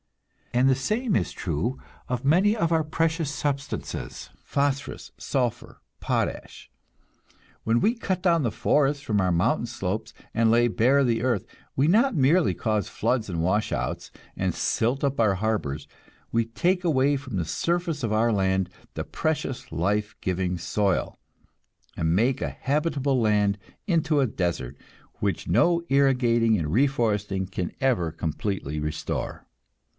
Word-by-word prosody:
And 125 +2 +3
the 135 - +5
same 215 - 0
is 90 - 0
true 115 - -2 0.3
of 125 +1 -2
many 190 +9 +4
of 170 -5 +1
our 160 -1 +3
precious 160 0 0
substances: 140 -2 -4
phosphorus, 140 0 -2
sulphur, 125 -5 -2 0.2
potash. - - -3 0.9
When 115 +1 +2
we 225 - +3
cut 185 -6 -2
down 170 -3 +3
the 120 -5 0
forests 145 +3 +1
from 105 -6 +1
our 90 -1 +2
mountain 105 +7 +1
slopes, 110 0 -4 0.2
and 115 -1 +3
lay 120 +1 +4
bare 130 +5 +3
the 115 -3 +1
earth, 120 -5 0 0.3
we 135 +3 +3
not 230 +7 +4
merely 155 +5 +4
cause 110 -2 -1
floods 115 -1 -1
and 85 -3 -2
washouts, 105 +5 -1 0.2
and - - -1
silt 125 +5 0
up 140 -2 0
our 105 -4 +4
harbors, 90 -9 -2 0.4
we 115 0 +2
take 180 +11 0
away 145 -4 +3
from 130 -7 -5
the 85 - -1
surface 170 - -1
of 115 - 0
our 115 +2 +3
land 95 -2 +1 0.3
the - - -2
precious 150 -5 -3
life 105 +6 0
giving 90 -1 -1
soil, 95 +3 0 0.8
and 80 +1 +1
make 125 +7 +2
a - - -1
habitable 140 -2 0
land 105 -2 +2 0.3
into 160 -4 +2
a 135 - +3
desert, 85 - -2 0.4
which - - -1
no 170 - +3
irrigating 125 -5 +3
and 80 -4 -2
reforesting 105 -7 +1
can 90 -2 -3
ever 120 - +1
completely 80 -2 -3
restore. 75 +1 -4
120 Hz, 145 wpm, -26 LUFS, 100-145 Hz, 0.9 s, the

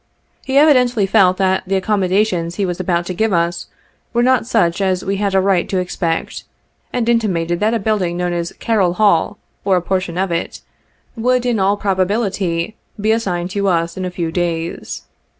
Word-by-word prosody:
He 270 0 0
evidently 250 -7 +4
felt 190 -2 +3
that 190 -1 +1
the 195 - 0
accommodations 190 -3 0
he 200 - 0
was 175 -1 -3
about 175 -2 0
to 185 - -4
give 220 +4 0
us 170 -1 0 0.5
were 240 0 +2
not 255 -2 +2
such 185 -6 +1
as 185 -2 0
we 195 +1 -1
had 200 -1 -1
a - - +5
right 190 -2 +1
to 190 - -1
expect, 175 -2 -2 0.5
and 240 -2 -1
intimated 175 -8 +1
that 220 +4 +1
a - - +2
building 195 -5 -1
known 180 0 -1
as 170 0 -3
Carroll 200 -7 +1
Hall, 200 -1 +2 0.3
or 195 -2 +3
a - - 0
portion 185 -2 -2
of 190 -1 0
it, 170 0 -3 0.5
would, 250 +1 +1
in 240 -3 +1
all 195 +2 +2
probability, 195 -2 -1 0.2
be 215 +2 +1
assign 195 -6 0
ed - - -5
to 200 0 -1
us 170 -2 0
in 185 - -4
a 185 - -2
few 170 -2 -3
days. 170 -1 -3
190 Hz, 190 wpm, -18 LUFS, 175-215 Hz, 0.5 s, a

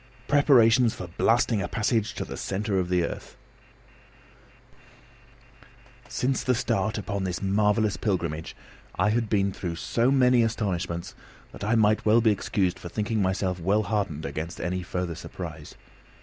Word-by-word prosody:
PREPARATIONS 125 -5 +5
FOR 90 -5 -7
BLASTING 115 -2 +3
A - - -2
PASSAGE 110 -1 0
TO - - -4
THE - - -7
CENTRE 100 0 -2
OF 90 -1 -2
THE 90 -1 +2
EARTH - - -8 2.7
Since 130 +1 0
the 125 - +1
start 110 -2 -1
upon 100 -2 -3
this 90 -1 -2
marvellous 105 +1 +2
pilgrimage 85 -6 -2 0.4
I 105 - +2
had 115 -1 0
been 100 -2 +2
through 90 -3 -5
so 115 +8 0
many 125 -2 +4
astonishments 95 -6 -2 0.4
that - - -9
I 110 +3 +1
might 110 -1 +3
well 110 +2 +5
be 110 -2 +4
excused 95 -2 -1
for 90 - -8
thinking 105 +3 -1
myself 95 -1 0
well 100 +5 +1
hardened 100 -9 -2
against 80 +4 -5
any 90 +1 -2
further 90 -1 -3
surprise. 80 -2 -8
100 Hz, 150 wpm, -26 LUFS, 90-115 Hz, 2.7 s, PREPARATIONS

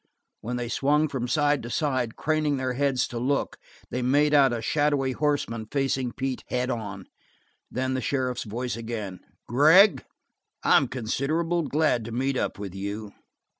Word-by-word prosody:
When 120 +4 -4
they 120 -1 -3
swung 145 +5 +2
from 125 -3 -3
side 145 +2 +2
to 120 - -7
side, 130 -5 -1
craning 155 -2 0
their 130 -1 -1
heads 135 -1 +1
to 120 - -4
look, 135 +4 -1 0.3
they 125 - -2
made 145 +4 +3
out 140 -3 +6
a 120 - -2
shadowy 145 +2 +1
horseman 130 -6 -1
facing 135 -1 -1
Pete 130 -1 -3
head 125 +1 -1
on. 105 -5 -5 0.6
Then 130 +1 -2
the 130 - -1
sheriff's 130 -3 -1
voice 120 +4 -3
again: 110 -5 -5 0.3
"Gregg, 160 - +6 0.6
I'm - - +5
considerable 155 +8 -1
glad 150 -5 +1
to 115 - -6
meet 130 +3 -1
up - - -1
with 100 -2 -6
you." 100 +2 -5
130 Hz, 160 wpm, -26 LUFS, 120-145 Hz, 0.6 s, out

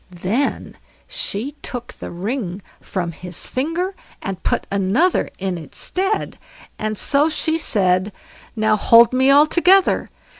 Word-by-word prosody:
Then 235 +10 -1 0.3
she 225 +8 -2
took 245 -1 -6
the - - -8
ring 195 0 -4 0.2
from 175 -3 -4
his 175 +1 -7
finger, 330 +8 -2 0.3
and 190 -2 -5
put - - -1
another 200 - +2
in 185 -2 -3
its 155 -4 -13
stead; 390 +3 -2 0.4
and 215 0 -2
so 290 +8 +2
she 315 0 0
said: 185 - +1 0.4
"Now 215 -1 +2
hold 230 +3 +6
me 260 +1 +3
all 285 +2 +7
together! 360 +4 +3
225 Hz, 135 wpm, -20 LUFS, 190-295 Hz, 0.4 s, all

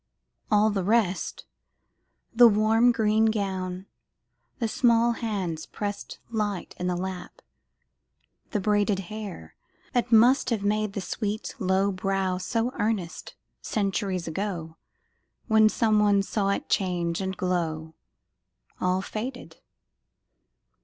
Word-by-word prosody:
All 215 0 +4
the 195 -2 -1
rest 205 -2 0 0.9
The 240 +1 +8
warm 220 +3 +4
green 220 -1 +2
gown, 190 -4 -2 0.7
the 235 -5 -1
small 235 +1 +3
hands 195 -9 -3
pressed 205 -1 -5
Light 210 -4 -2
in 180 - -2
the 180 - 0
lap, 180 0 -6 1.1
the 210 - -1
braided 205 0 +2 0.2
hair 200 - -7 0.4
That 245 -1 0
must 240 +4 +5
have 225 -4 -1
made 210 0 0
the 200 - -3
sweet 210 +2 -3
low 190 +1 +2
brow 190 -1 -1
So 230 +5 -1
earnest, 210 -5 -2 0.3
centuries 195 -3 -2
ago, 165 -2 -4 0.7
When 220 -1 +5
some 215 -1 +2
one 205 -1 +4
saw 200 0 -1
it 200 - -1
change 175 -2 0
and 190 0 -3
glow 160 -3 -2 0.9
All 185 +1 0
faded! 220 -6 -6
205 Hz, 115 wpm, -26 LUFS, 185-220 Hz, 1.1 s, The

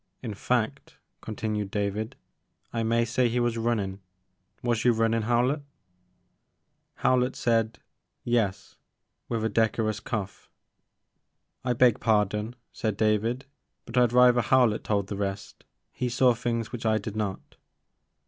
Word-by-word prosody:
In 115 -4 -4
fact," 110 +2 -2 0.2
continued 105 -1 -3
David, 105 +2 -2 0.6
I 115 - 0
may 115 +1 +2
say 120 +1 +1
he 120 +2 0
was 120 -1 +1
runnin'. 110 -5 -1 0.6
Was 120 -2 +1
you 120 -2 +4
rtmnin', 115 0 +1
Howlett?" 125 +5 +2 1.3
Howlett 125 0 +2
said 115 0 +1 0.5
Yes," 115 -5 -1 0.5
with 115 -2 -1
a - - +3
decorous 110 -1 +1
cough. 105 -3 -5 0.6
" - - -51
I 125 -1 +1
beg 120 -2 +4
pardon," 105 +1 +1 0.2
said 110 -5 -2
David, 110 +4 +1 0.4
but 115 - -8
I 125 -1 +5
'd - - -10
rather 125 -1 +6
Howlett 120 -2 +3
told 100 -2 0
the 100 0 -5
rest. 100 0 -5 0.3
He 125 - -2
saw 125 +1 +4
things 115 -1 -2
which 120 -2 -6
I 110 -1 +3
did 110 0 -5
not." 105 -3 -4
115 Hz, 140 wpm, -27 LUFS, 105-120 Hz, 1.3 s, rather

